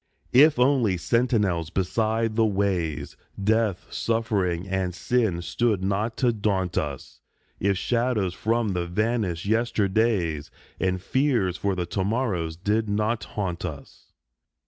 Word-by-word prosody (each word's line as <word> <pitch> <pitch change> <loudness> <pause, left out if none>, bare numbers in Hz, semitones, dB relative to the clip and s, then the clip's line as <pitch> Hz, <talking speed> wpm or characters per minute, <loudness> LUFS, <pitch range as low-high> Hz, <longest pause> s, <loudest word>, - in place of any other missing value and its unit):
If 145 +3 +7
only 125 -7 +3
sentinels 105 -7 +1
beside 110 +5 0
the 115 - +3
ways, 95 -6 -1 0.2
Death, 105 -2 +1
suffering, 100 -6 0
and 95 -2 -1
sin 110 -9 0
stood 110 -1 0
not 105 +4 -1
to 125 -2 +2
daunt 95 -5 -1
us, 70 -3 -4 0.4
If 100 -1 +1
shadows 115 -5 0
from 115 +3 0
the 90 -2 -2
vanished 100 -2 -1
yesterdays 105 -7 +1 0.3
And 95 0 0
fears 120 -4 +1
for 100 +1 -1
the 90 -1 -2
to 95 +2 -2
morrows 95 -7 -1
did 105 +5 0
not 105 +1 0
haunt 95 -5 -4
us. 75 -6 -8
100 Hz, 125 wpm, -25 LUFS, 90-115 Hz, 0.4 s, If